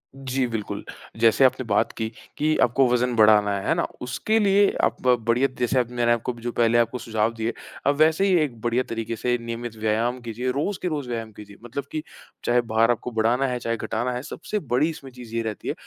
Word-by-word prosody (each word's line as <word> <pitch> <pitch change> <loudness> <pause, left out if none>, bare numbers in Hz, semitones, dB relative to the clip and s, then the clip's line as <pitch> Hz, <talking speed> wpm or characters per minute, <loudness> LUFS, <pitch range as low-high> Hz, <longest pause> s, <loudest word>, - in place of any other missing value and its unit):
जी, 135 -1 -1
बिल्कुल। 110 -3 -4 0.4
जैसे 115 +4 +5
आपने 130 - +2
बात 105 -2 +1
की, 110 -1 -1 0.3
कि 155 +1 +2
आपको 125 +2 +3
वज़न 125 0 +1
बढ़ाना 105 -2 +5
है, 95 - -5
है - - +4
ना? - - +1 0.2
उसके 170 - 0
लिए 200 -1 +4
आप - - +2
बढ़िया 120 +2 +3
जैसे 125 +1 +2
अब 120 -2 0
मैंने 120 -1 +1
आपको 120 +2 0
भी 115 - -14
जो 120 +1 -3
पहले 120 0 +3
आपको 120 +1 +1
सुझाव 110 0 0
दिए, 115 +1 -2 0.3
आप 140 - +4
वैसे 160 +5 +3
ही 190 - +3
एक 120 -7 -5
बढ़िया 120 +2 +1
तरीके 115 0 -3
से 120 +2 0
नियमित 115 0 -5
व्यायाम 110 +3 0
कीजिए। 120 +2 -3
रोज़ 155 +9 -2
के 180 - -1
रोज़ 145 -6 -3
व्यायाम 115 -2 -4
कीजिए। 105 -1 -13
मतलब 125 +4 -5
कि 155 - -3 0.4
चाहे 120 0 +3
भार 115 0 +2
आपको 120 +1 -3
बढ़ाना 115 +4 +2
है, 125 -1 -2
चाहे 115 0 -2
घटाना 120 +3 -2
है, 125 - -3
सबसे 190 +8 -4
बड़ी 140 +1 +1
इसमें 140 -5 -9
चीज़ 120 -2 -10
ये 115 - +1
रहती 110 -2 -5
है - - 0
120 Hz, 225 wpm, -24 LUFS, 115-130 Hz, 0.4 s, जैसे